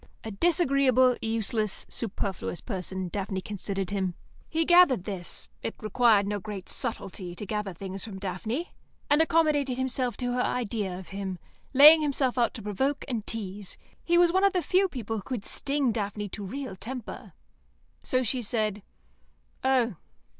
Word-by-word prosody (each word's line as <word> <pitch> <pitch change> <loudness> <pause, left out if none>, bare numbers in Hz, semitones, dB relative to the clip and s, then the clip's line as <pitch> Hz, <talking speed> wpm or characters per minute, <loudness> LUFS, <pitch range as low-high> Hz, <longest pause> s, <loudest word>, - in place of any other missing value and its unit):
A 220 - -5
disagreeable, 270 - +4
useless, 220 -2 -1
superfluous 195 -5 -3
person, 190 -3 -3
Daphne 195 0 -3
considered 195 -1 -4
him. 190 -3 -1 0.3
He 325 +1 +1
gathered 345 - +6
this; 175 - -5
it - - -4
required 215 -2 +4
no 205 0 -2
great 200 -1 -7
subtlety 190 -7 -3
to 210 - -6
gather 210 -1 -2
things 190 +2 -6
from 205 -4 -6
Daphne; 210 - -4 0.4
and 295 +2 +6
accommodated 305 -5 +2
himself 260 -1 -1
to 245 -1 -1
her 250 - +1
idea 210 -7 -1
of 185 - -10
him, 195 -1 -4 0.3
laying 300 +4 +9
himself 275 -4 +1
out 235 - +2
to 225 - -7
provoke 265 +8 -1
and 230 -5 -3
tease. 205 -3 -4 0.3
He 345 0 +3
was 345 -1 +5
one 380 +1 +3
of 395 0 +5
the 360 -2 +1
few 375 +5 +3
people 225 - -4
who - - -4
could 235 -1 -5
sting 280 -3 0
Daphne 205 -1 -3
to 205 - -7
real 260 +4 -5
temper. 240 +4 -7 0.7
So 255 0 +1
she 250 +2 -1
said, 215 -2 -1 0.8
"Oh." 250 -7 +2
225 Hz, 160 wpm, -28 LUFS, 195-265 Hz, 0.8 s, laying